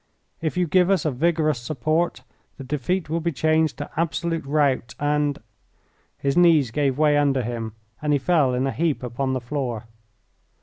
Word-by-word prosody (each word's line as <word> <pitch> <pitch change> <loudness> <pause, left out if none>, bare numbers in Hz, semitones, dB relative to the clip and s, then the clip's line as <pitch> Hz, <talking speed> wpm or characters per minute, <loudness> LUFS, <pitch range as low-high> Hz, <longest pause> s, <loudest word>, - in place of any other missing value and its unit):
If 160 +2 -2
you 180 - +2
give 180 +2 +3
us 190 -6 +2
a 155 - +2
vigorous 155 0 +1
support 155 +6 -1 0.3
the 135 - -8
defeat 150 +6 -2
will 165 +2 -1
be 170 +1 -1
changed 155 +1 +1
to 145 - -6
absolute 165 0 -1
rout 140 -5 +1
and 145 -1 +1 0.4
" - - -41
His 140 0 +1
knees 165 -8 +5
gave 140 -1 0
way 150 -1 +4
under 140 -3 +2
him 115 -2 -4 0.3
and 150 -1 0
he 145 - +4
fell 140 -3 +2
in 130 +2 0
a 135 - 0
heap 160 -4 -1
upon 130 +2 -2
the 130 - -1
floor. 120 -3 -3
150 Hz, 180 wpm, -23 LUFS, 130-160 Hz, 0.4 s, knees